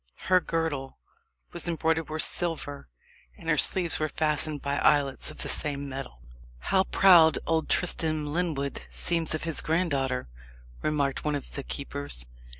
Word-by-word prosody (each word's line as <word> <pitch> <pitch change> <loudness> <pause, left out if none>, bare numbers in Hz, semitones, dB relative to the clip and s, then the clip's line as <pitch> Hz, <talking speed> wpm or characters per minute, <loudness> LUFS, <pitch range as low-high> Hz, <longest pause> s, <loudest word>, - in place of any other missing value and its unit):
Her 185 0 +6
girdle 160 -6 -3 0.6
was - - -4
embroidered 160 -1 0
with 155 0 +2
silver, 160 -5 -2 0.5
and - - -12
her - - +3
sleeves 175 -3 +2
were 155 0 -1
fastened 155 0 +1
by 140 +1 -2
aiglets 140 -3 +2
of - - -5
the - - -4
same 140 -2 -1
metal. 130 - -8 0.3
"How 190 - +1
proud 170 -5 +6
old 160 -1 0
Tristram 155 -3 0
Lyndwood 150 -3 -2
seems 165 -2 +1
of 155 - -5
his 165 -1 +2
granddaughter," 140 - 0 0.5
remarked 140 -3 -1
one 150 -1 0
of 140 - -6
the 140 - -4
keepers. 140 - -4
155 Hz, 150 wpm, -27 LUFS, 140-165 Hz, 0.6 s, Her